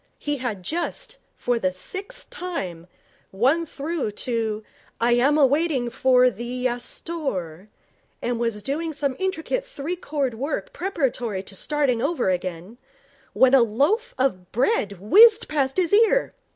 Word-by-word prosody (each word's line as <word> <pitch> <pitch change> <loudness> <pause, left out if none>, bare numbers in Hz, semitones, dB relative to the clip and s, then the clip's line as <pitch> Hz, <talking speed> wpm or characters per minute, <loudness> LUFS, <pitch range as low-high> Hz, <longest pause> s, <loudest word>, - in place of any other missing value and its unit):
He 290 -1 -2
had 230 -8 -4
just, 345 - -4 0.2
for 245 -1 -1
the 185 -4 +1
sixth 395 - -7
time, 185 - -5 0.4
won 270 +12 +2
through 295 -6 -3
to 225 -3 -1 0.4
'Iyam 240 +5 +3
ah 290 - +6
waiting 275 -3 +1
for 250 +1 +4
er 250 - +5
theeee 240 +4 -5
yass 245 -1 -1
thorre,' 195 - -4 0.5
and 240 -1 -2
was 230 -3 -2
doing 315 +5 -2
some 280 -3 -1
intricate 380 +6 -1
three 340 - -5
chord 285 -7 -2
work 285 - -4
preparatory 255 - -2
to 200 - -11
starting 275 0 +1
over 280 - +1
again, 180 +5 -5 0.5
when 260 0 +4
a 270 - +7
loaf 300 - +1
of 185 -9 -1
bread 245 - +1
whizzed 425 - +6
past 275 -2 -1
his 360 -1 +1
ear. 455 +4 +4
265 Hz, 145 wpm, -24 LUFS, 230-330 Hz, 0.5 s, a